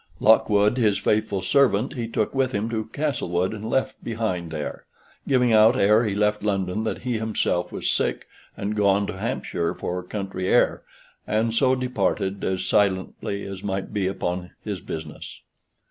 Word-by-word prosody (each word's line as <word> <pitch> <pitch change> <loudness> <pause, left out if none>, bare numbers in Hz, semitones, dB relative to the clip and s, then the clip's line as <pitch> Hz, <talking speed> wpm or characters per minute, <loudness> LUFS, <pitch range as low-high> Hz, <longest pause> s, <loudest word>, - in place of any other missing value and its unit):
Lockwood, 105 0 +4
his 105 -4 +3
faithful 105 -3 0
servant, 130 -3 +3
he 120 -3 -3
took 110 -2 -1
with 135 -1 +1
him 105 +3 -1
to 110 -1 -3
Castlewood, 95 - -1
and 110 +1 -6
left 130 - -1
behind 110 -7 -2
there: 75 -2 -5 0.4
giving 125 -3 +3
out 110 +3 +6
ere 105 +2 +4
he 100 -2 -1
left 105 0 +1
London 100 0 -1
that 110 - -3
he 125 -3 -1
himself 110 -5 -1
was - - -3
sick, - - 0 0.3
and 105 +2 -2
gone 100 -1 +3
to 95 - -6
Hampshire 100 -7 -2
for 90 +1 -3
country 95 0 -4
air, - - +3 0.5
and 110 +1 +1
so 130 +2 +3
departed 100 -6 -1
as 95 -1 -1
silently 100 0 0
as 95 -1 -7
might 95 -1 -3
be 100 -3 0
upon 90 -1 -3
his 100 -3 -4
business. 80 -2 -8
105 Hz, 160 wpm, -24 LUFS, 95-115 Hz, 0.5 s, out